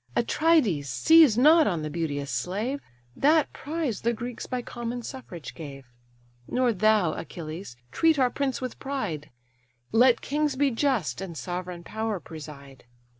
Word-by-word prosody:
Atrides, 235 Hz, -, +2 dB
seize 250 Hz, -, +6 dB
not 310 Hz, +4 st, +6 dB
on 170 Hz, -5 st, -1 dB
the 155 Hz, -, -3 dB
beauteous 145 Hz, -4 st, -3 dB
slave; 205 Hz, -, -2 dB, 0.4 s
That 300 Hz, +1 st, +3 dB
prize 295 Hz, -, -3 dB
the 235 Hz, +1 st, +1 dB
Greeks 240 Hz, +1 st, -6 dB
by 250 Hz, -1 st, -3 dB
common 240 Hz, 0 st, -5 dB
suffrage 220 Hz, -, -8 dB
gave: 140 Hz, -5 st, -9 dB, 0.6 s
Nor 250 Hz, -2 st, +1 dB
thou, 210 Hz, -4 st, +3 dB
Achilles, 160 Hz, -4 st, -7 dB
treat 325 Hz, -, +3 dB
our 255 Hz, -2 st, +3 dB
prince 270 Hz, -1 st, -2 dB
with 255 Hz, -1 st, -5 dB
pride; 205 Hz, -, -4 dB, 0.6 s
Let 240 Hz, +1 st, +5 dB
kings 295 Hz, 0 st, 0 dB
be 275 Hz, 0 st, +2 dB
just, 225 Hz, -, 0 dB
and 175 Hz, -4 st, -6 dB
sovereign 180 Hz, 0 st, -5 dB
power 220 Hz, +1 st, -3 dB
preside. 140 Hz, -5 st, -11 dB
220 Hz, 140 wpm, -26 LUFS, 160-265 Hz, 0.6 s, seize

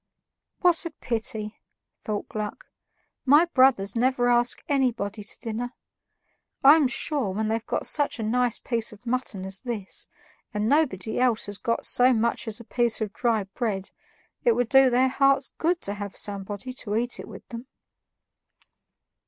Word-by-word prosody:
"What 350 Hz, -2 st, +3 dB
a 335 Hz, -, -4 dB
pity," 220 Hz, -6 st, -4 dB, 0.4 s
thought 210 Hz, -1 st, -4 dB
Gluck, 215 Hz, -, -5 dB, 0.6 s
"my 290 Hz, +5 st, +6 dB
brothers 255 Hz, -, +3 dB
never 245 Hz, 0 st, +2 dB
ask 240 Hz, 0 st, +2 dB
anybody 230 Hz, -, 0 dB
to 205 Hz, -, -9 dB
dinner. 240 Hz, +2 st, -4 dB, 0.9 s
I'm 290 Hz, +1 st, +7 dB
sure, 265 Hz, -3 st, 0 dB
when 215 Hz, +3 st, -2 dB
they've 225 Hz, +1 st, -2 dB
got -, -, -1 dB
such 290 Hz, -2 st, 0 dB
a 225 Hz, -, -4 dB
nice 240 Hz, +1 st, +1 dB
piece 230 Hz, -3 st, -1 dB
of 215 Hz, +3 st, -15 dB
mutton 235 Hz, -6 st, -2 dB
as 190 Hz, 0 st, -2 dB
this, 230 Hz, -6 st, -5 dB, 0.5 s
and 210 Hz, +1 st, 0 dB
nobody 255 Hz, -8 st, +1 dB
else 245 Hz, -3 st, +2 dB
has 205 Hz, -1 st, -7 dB
got 230 Hz, -, -1 dB
so 255 Hz, +1 st, +5 dB
much 235 Hz, +1 st, 0 dB
as 220 Hz, +1 st, -5 dB
a -, -, -10 dB
piece 240 Hz, 0 st, +1 dB
of 215 Hz, -2 st, -3 dB
dry 230 Hz, -4 st, +1 dB
bread, 195 Hz, -1 st, -3 dB, 0.5 s
it 475 Hz, -, +4 dB
would 245 Hz, -, 0 dB
do 270 Hz, -1 st, +6 dB
their 250 Hz, +2 st, +3 dB
hearts 275 Hz, 0 st, +2 dB
good 340 Hz, +2 st, +1 dB
to 200 Hz, -, -2 dB
have 205 Hz, -1 st, -6 dB
somebody 205 Hz, +4 st, -4 dB
to 210 Hz, -4 st, -4 dB
eat 240 Hz, +2 st, -1 dB
it -, -, -8 dB
with -, -, -11 dB
them." 235 Hz, +1 st, -8 dB
235 Hz, 160 wpm, -26 LUFS, 210-260 Hz, 0.9 s, I'm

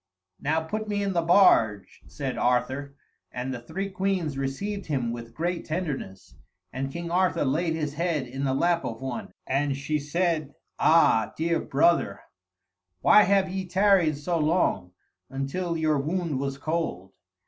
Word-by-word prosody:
"Now 160 Hz, +3 st, 0 dB
put 215 Hz, +7 st, -4 dB
me 205 Hz, -1 st, -1 dB
in 195 Hz, -1 st, -1 dB
the 170 Hz, -, +2 dB
barge," 165 Hz, -, +3 dB
said -, -, -4 dB
Arthur, 130 Hz, +3 st, 0 dB, 0.4 s
and 125 Hz, +2 st, -4 dB
the 125 Hz, -, -5 dB
three 195 Hz, +11 st, -4 dB
queens 190 Hz, -6 st, -1 dB
received 190 Hz, +10 st, -3 dB
him 130 Hz, -6 st, -1 dB
with 115 Hz, 0 st, -8 dB
great 170 Hz, +1 st, -2 dB
tenderness, 150 Hz, -, -5 dB, 0.4 s
and 135 Hz, +1 st, -3 dB
King 170 Hz, +1 st, -5 dB
Arthur 180 Hz, -3 st, +2 dB
laid 160 Hz, +5 st, 0 dB
his 150 Hz, -3 st, -3 dB
head 160 Hz, -3 st, -1 dB
in 135 Hz, +3 st, -5 dB
the 135 Hz, -1 st, +1 dB
lap 170 Hz, +3 st, +2 dB
of 115 Hz, -1 st, -5 dB
one, 130 Hz, -3 st, -5 dB
and 140 Hz, +1 st, 0 dB
she 150 Hz, +2 st, -1 dB
said, 155 Hz, 0 st, -1 dB, 0.2 s
"Ah, 155 Hz, -9 st, +4 dB
dear 165 Hz, +1 st, +1 dB
brother, 140 Hz, -9 st, +2 dB, 0.8 s
why 210 Hz, -, +7 dB
have 195 Hz, -1 st, +3 dB
ye 190 Hz, 0 st, -4 dB
tarried 185 Hz, -5 st, +3 dB
so 165 Hz, +3 st, -1 dB
long, 150 Hz, -, +1 dB, 0.4 s
until 150 Hz, +6 st, -3 dB
your 155 Hz, -2 st, +1 dB
wound 160 Hz, -1 st, -2 dB
was 135 Hz, 0 st, -3 dB
cold?" 150 Hz, -, -3 dB
155 Hz, 155 wpm, -26 LUFS, 135-175 Hz, 0.8 s, why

